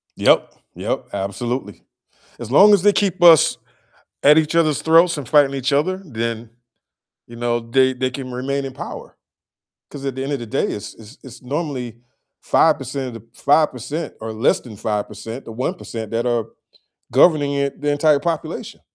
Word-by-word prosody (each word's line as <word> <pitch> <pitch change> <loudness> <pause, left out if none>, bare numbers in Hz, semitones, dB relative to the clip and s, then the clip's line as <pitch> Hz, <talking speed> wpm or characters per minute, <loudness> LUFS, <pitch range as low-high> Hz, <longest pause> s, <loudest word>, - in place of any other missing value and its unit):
Yep, - - +3 0.2
yep, - - -3
absolutely. 100 +2 -4 0.6
As 120 0 -7
long 205 +8 +7
as 195 -2 +3
they 205 -1 +5
keep 190 -3 0
us 165 -3 +7 0.7
at 150 +2 +7
each 155 +1 0
other's 155 -3 +2
throats 165 +1 +4
and 140 -5 -7
fighting 145 -2 +4
each 135 +1 -1
other, 185 +7 0
then, 115 -4 -4 0.8
you 120 - -12
know, 120 0 -1
they 130 +3 +2
they 130 0 -1
can 130 -1 -7
remain 135 +2 -3
in 135 - -7
power. - - -9 0.7
'Cause 140 -1 -9
at 135 -2 -3
the 130 - -4
end 140 +2 -3
of 140 - -1
the 120 - -7
day, - - -1
it's 105 - -6
it's 110 +5 -15
it's 125 -2 -13
normally 130 -4 -4 0.4
5% 135 -4 +1
of 120 - -8
the 115 0 -12
5%, 145 +1 0
or 110 0 -5
less 110 +4 +1
than 110 -5 -12
5%, 105 +3 -4
the 115 - -9
1% 115 - -5
that 115 +2 -1
are 120 -2 0 0.7
governing 145 0 +4
the 140 0 +1
e - - -3
the 145 0 -1
entire 145 0 +3
population. 165 -3 -4
135 Hz, 175 wpm, -20 LUFS, 115-150 Hz, 0.8 s, long